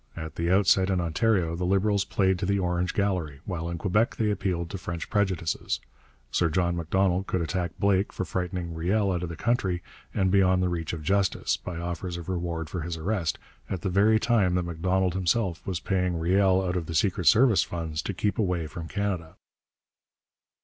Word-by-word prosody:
At 80 0 -6
the 85 +1 -1
outset 95 0 +4
in 95 -2 +1
Ontario 85 0 +1
the 90 - -3
Liberals 100 +2 +2
played 95 -4 +1
to 95 - -1
the 100 0 +2
Orange 90 -1 -1
gallery, 90 -9 -1
while 85 -3 -3
in 85 - -3
Quebec 105 +6 +1
they 110 -2 +1
appealed 90 -4 -2
to 95 - -5
French 85 -2 -5
prejudices. 95 -6 0 0.5
Sir 85 - +2
John 85 +1 +1
Macdonald 90 +3 +1
could 95 - 0
attack 85 +2 -2
Blake 100 -1 +2
for 95 - -3
frightening 90 -1 -3
Riel 95 +5 +1
out 90 -2 -1
of 90 - -3
the 85 - -5
country 95 -5 0 0.3
and 95 -2 +1
beyond 95 -1 +4
the 90 - +1
reach 85 -2 -3
of 80 -2 -5
justice, 95 +3 +1
by 90 -2 -7
offers 85 +1 -4
of 85 +1 -8
reward 85 -3 -2
for 85 +2 -4
his 85 +1 -4
arrest, 85 -1 -1 0.3
at 95 - -3
the 95 - 0
very 105 +4 +4
time 110 -6 +2
that 90 - +1
Macdonald 90 +2 0
himself 95 -1 0
was 90 -3 -1
paying 90 -2 0
Riel 95 +3 +3
out 90 -1 -1
of 85 -3 -2
the 80 - -4
secret 90 0 +1
service 115 - +6
funds 80 -3 -3
to - - -3
keep 105 +5 -1
away 90 -6 0
from 80 +1 -7
Canada. 95 -5 -3
90 Hz, 195 wpm, -27 LUFS, 85-95 Hz, 0.5 s, service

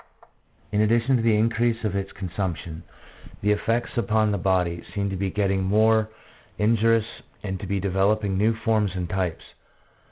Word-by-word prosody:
In 105 - +2
addition 115 +4 +3
to - - -1
the 115 -1 +3
increase 115 +1 +1
of 105 -3 -1
its 100 0 -3
consumption, 90 -3 -4 0.6
the 105 - +3
effects 115 +3 0
upon 110 -2 +2
the 100 - -1
body 90 -2 0
seem 100 -1 -1
to - - -3
be 95 +1 -1
getting 95 -1 0
more 110 +2 +3 0.5
in 110 +3 +3
jurious 115 0 +3 0.4
and 95 -2 -4
to 100 - -6
be 100 +1 -1
developing 100 +1 +1
new 110 +4 +2
forms 110 -3 0
and 90 -2 -2
types. 90 -2 -2
105 Hz, 165 wpm, -24 LUFS, 95-110 Hz, 0.6 s, addition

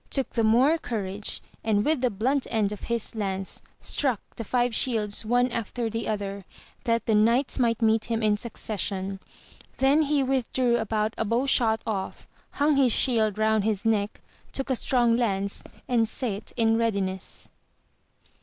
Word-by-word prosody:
took 270 -2 -1
the 230 - 0
more 255 +9 +4
courage, 205 -5 -4 0.2
and 210 -2 +1
with 305 -4 +1
the 250 - +3
blunt 255 +7 0
end 210 -3 +1
of 210 - -6
his 235 -2 -2
lance 195 -3 -2 0.2
struck 260 -8 +1 0.2
the 230 - -5
five 245 +2 0
shields 220 -5 +1
one 245 +3 +2
after 230 0 -3
the 230 +1 -3
other, 200 -2 -3 0.4
that 230 -1 +1
the 225 - +1
knights 235 +7 +3
might 235 -1 +1
meet 220 0 +3
him 230 -1 -2
in 210 -1 +3
succession: 200 -3 -3 0.6
then 275 +4 +4
he 290 -2 +2
with 265 -2 -1
drew 245 -2 +2
about 220 -1 -1
a - - +2
bow 230 +5 0
shot 225 -5 +2
off, 200 -4 -4 0.3
hung 290 0 +2
his 260 -3 +4
shield 220 -4 +2
round 220 -1 +2
his 215 0 -1
neck, 210 -2 0 0.3
took 270 0 -2
a - - +3
strong 240 -1 +2
lance, 200 -4 -1 0.2
and 230 -3 +2
sate 220 -4 -3
in 225 -1 +3
readiness. 195 -5 -2
225 Hz, 165 wpm, -26 LUFS, 210-245 Hz, 0.6 s, more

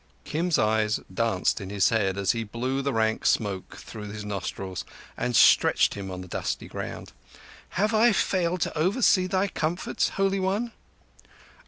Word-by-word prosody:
Kim's 170 +2 0
eyes 110 0 +2
danced 105 -3 0
in 95 - -6
his 100 -1 +2
head 100 -4 +1
as 100 -1 +2
he 115 -1 -2
blew 125 +5 -2
the 140 0 -1
rank 110 -2 0
smoke 100 -4 0
through 105 -2 -9
his 105 0 -7
nostrils 95 -2 -4 0.3
and 125 -1 -2
stretched - - +5
him 100 -1 -6
on 90 -1 -6
the 90 - -9
dusty - - -3
ground. - - -7 0.6
"Have 210 +4 +2
I 225 +2 +5
failed 180 -3 0
to - - -1
oversee 185 +3 +3
thy 190 +2 +1
comforts, 175 -1 -1
Holy 195 0 +2
One?" 200 +5 -1
115 Hz, 160 wpm, -26 LUFS, -, 0.6 s, stretched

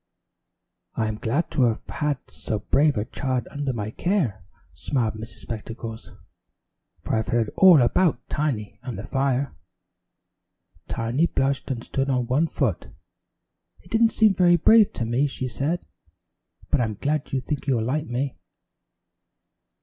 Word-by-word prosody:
"I'm 110 -1 -1
glad 140 +11 -1
to 150 - 0
have 115 -2 0 0.4
so 110 - -4
brave 140 +6 +2
a 105 - 0
child 130 0 -2
under 145 -2 -2
my 110 -3 -4
care," 135 - -1 0.3
smiled 115 - -1
Miss 110 +1 -9
Spectacles, 115 0 -7 0.9
"for - - -1
I've 110 -1 0
heard 115 -2 +1
all 180 -8 +8
about 135 +1 +1
Tiny 130 -9 -2
and 125 -6 -6
the 105 - -6
fire." 135 +1 0 1.3
Tiny 120 +9 0
blushed 135 -2 -1
and 120 -3 -3
stood 135 +1 -2
on 125 -2 +1
one 140 +7 +2
foot. 130 - -1 0.9
"It 175 - -20
didn't 225 0 +4
seem 215 -2 +4
very 175 -2 +5
brave 215 +5 +6
to 115 - -3
me," 120 +5 +1
she 130 -2 -4
said, 140 +8 -2 0.9
"but 145 - +3
I'm 110 -3 -1
glad 145 +6 -2
you 135 - +1
think 145 +3 -4
you'll 120 -5 +2
like 150 +5 -1
me." 130 +3 -3
130 Hz, 140 wpm, -24 LUFS, 115-150 Hz, 1.3 s, all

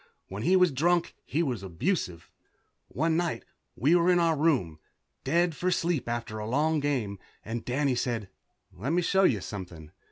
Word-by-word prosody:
When 100 +2 -5
he 180 +10 +3
was 180 -3 +5
drunk 170 +5 +1
he 165 +4 0
was 125 - -2
abusive. 95 - -2 0.6
One 160 +4 0
night 170 0 -1 0.3
we 145 - +3
were 175 0 +4
in 180 - +5
our 165 -2 +3
room, 135 - +1 0.4
dead 170 -1 +1
for 180 - 0
sleep 165 -8 0
after 115 -2 -3
a 105 - -4
long 155 +5 +2
game, 125 -9 -1 0.3
and 115 +1 -4
Danny 135 +2 0
said, 120 -4 -2 0.5
"Let 130 - -3
me 175 +1 +2
show 190 +2 +3
you 105 - +2
something." 90 -6 -8
140 Hz, 170 wpm, -28 LUFS, 110-170 Hz, 0.6 s, was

